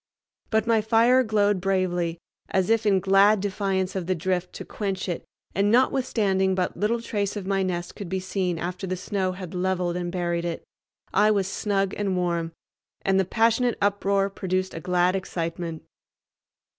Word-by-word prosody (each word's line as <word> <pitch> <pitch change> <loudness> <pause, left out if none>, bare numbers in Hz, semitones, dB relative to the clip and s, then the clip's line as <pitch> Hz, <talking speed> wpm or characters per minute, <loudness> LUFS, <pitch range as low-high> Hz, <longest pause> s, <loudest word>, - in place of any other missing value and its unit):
But 220 0 +2
my 230 -2 +3
fire 230 +4 +4
glowed 205 -4 +2
bravely 180 -3 0 0.3
as 190 +3 +1
if 225 -1 +2
in 195 -2 +4
glad 195 +2 +5
defiance 195 -1 -1
of 185 -3 -3
the 185 - +1
drift 180 +1 -1
to - - -7
quench 195 -3 -3
it, 175 - -3 0.3
and, 200 +1 +2
notwithstanding 215 -6 +2
but 185 -1 -1
little 215 +5 0
trace 205 -3 -2
of 205 -3 -5
my 195 0 +1
nest 175 -2 -3
could 200 -4 -7
be 190 +1 -1
seen 185 -2 -2
after 180 +3 -4
the 185 0 -2
snow 185 0 -2
had 185 -2 -8
leveled 180 -1 0
and 175 -1 -3
buried 175 -1 -1
it, 170 -1 -4 0.5
I 210 +2 +4
was 200 -3 +2
snug 195 -1 -1
and 195 -3 -1
warm, 170 -2 -1 0.5
and 195 0 +2
the 190 - +2
passionate 230 +4 +2
uproar 200 -1 +1
produced 185 -1 -2
a - - -5
glad 180 +2 +2
excitement. 170 -3 -4
190 Hz, 170 wpm, -25 LUFS, 180-205 Hz, 0.5 s, glad